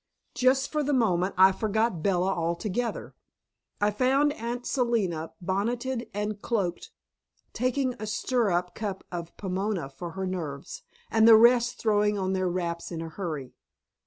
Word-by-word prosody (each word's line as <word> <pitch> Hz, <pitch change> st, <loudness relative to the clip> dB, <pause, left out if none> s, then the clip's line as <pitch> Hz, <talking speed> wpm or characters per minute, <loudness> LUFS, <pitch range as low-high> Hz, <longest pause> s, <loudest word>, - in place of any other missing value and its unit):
Just 265 Hz, +2 st, +2 dB
for 305 Hz, -, 0 dB
the 290 Hz, 0 st, 0 dB
moment 190 Hz, -6 st, +1 dB
I 190 Hz, +1 st, +8 dB
forgot 220 Hz, -2 st, 0 dB
Bella 190 Hz, +1 st, +1 dB
altogether. 185 Hz, +8 st, -2 dB, 0.7 s
I 205 Hz, 0 st, +2 dB
found 270 Hz, +6 st, +2 dB
Aunt 240 Hz, +1 st, -5 dB
Selina 205 Hz, -, 0 dB
bonneted 235 Hz, +7 st, -2 dB
and 210 Hz, 0 st, -3 dB
cloaked, 195 Hz, -8 st, -2 dB, 0.6 s
taking 255 Hz, +2 st, 0 dB
a 215 Hz, -, -5 dB
stirrup 200 Hz, -6 st, 0 dB
cup 205 Hz, -3 st, -4 dB
of 170 Hz, -2 st, -6 dB
Pomona 190 Hz, -4 st, -2 dB
for 165 Hz, +5 st, -8 dB
her 190 Hz, 0 st, -3 dB
nerves, 160 Hz, -7 st, -5 dB, 0.3 s
and 220 Hz, 0 st, +5 dB
the 225 Hz, -, +10 dB
rest 240 Hz, +1 st, +5 dB
throwing 210 Hz, -1 st, +2 dB
on 190 Hz, -1 st, -1 dB
their 185 Hz, -1 st, 0 dB
wraps 170 Hz, -1 st, -3 dB
in 165 Hz, -, -4 dB
a 165 Hz, 0 st, -5 dB
hurry. 155 Hz, -7 st, -5 dB
205 Hz, 145 wpm, -27 LUFS, 180-235 Hz, 0.7 s, the